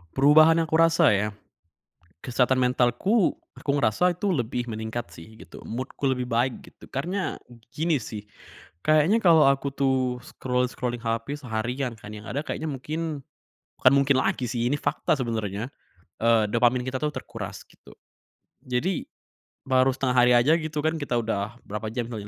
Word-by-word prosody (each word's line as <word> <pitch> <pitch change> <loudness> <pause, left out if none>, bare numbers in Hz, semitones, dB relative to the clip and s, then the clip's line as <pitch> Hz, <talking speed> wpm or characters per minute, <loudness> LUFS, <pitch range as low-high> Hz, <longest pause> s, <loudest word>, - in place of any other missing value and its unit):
Perubahan 155 +4 +6
aku 160 0 -1
rasa 165 -2 +5
ya, 105 +1 +1 1.0
kesehatan 125 +1 +1
mentalku, 125 - +2 0.2
aku - - -11
ngerasa 160 +8 +2
itu 190 +2 0
lebih 120 -3 -2
meningkat 110 -1 -5
sih 85 +7 -13
gitu, - - -13
mood-ku 130 +3 -3
lebih 125 -1 -1
baik 120 +1 -1
gitu, - - -16
karena 180 +8 -3 0.3
gini 155 +1 0
sih, 105 -1 -7 0.6
kayaknya 155 +8 +4
kalau 165 -9 +6
aku 140 0 -1
tuh 135 -1 +2 0.3
scroll-scrolling 125 -1 -2
HP 115 +6 -3
seharian 120 +1 -3
kan, 105 0 -10
yang 105 +1 -10
ada 140 +8 -3
kayaknya 160 - -3
mungkin 150 +2 -4 0.6
bukan 130 - +7
mungkin 140 0 +3
lagi 125 - -1
sih, 120 0 -2
ini 145 - 0
fakta 150 - 0
sebenarnya, 110 -3 -3 0.5
eee, 115 -1 +3
dopamin 120 +3 +2
kita 130 0 -2
tuh 150 +1 -2
terkuras - - -7
gitu. - - -18 0.7
Jadi, 135 +8 -1 0.6
baru 130 0 +2
setengah 130 -2 -1
hari 125 0 +5
aja 145 +8 +4
gitu 155 -2 -4
kan 160 +1 0
kita 145 -4 -2
udah 110 -2 -2
berapa 105 +2 -5
jam 120 +2 -4
kali 105 -3 -6
130 Hz, 155 wpm, -25 LUFS, 115-150 Hz, 1.0 s, bukan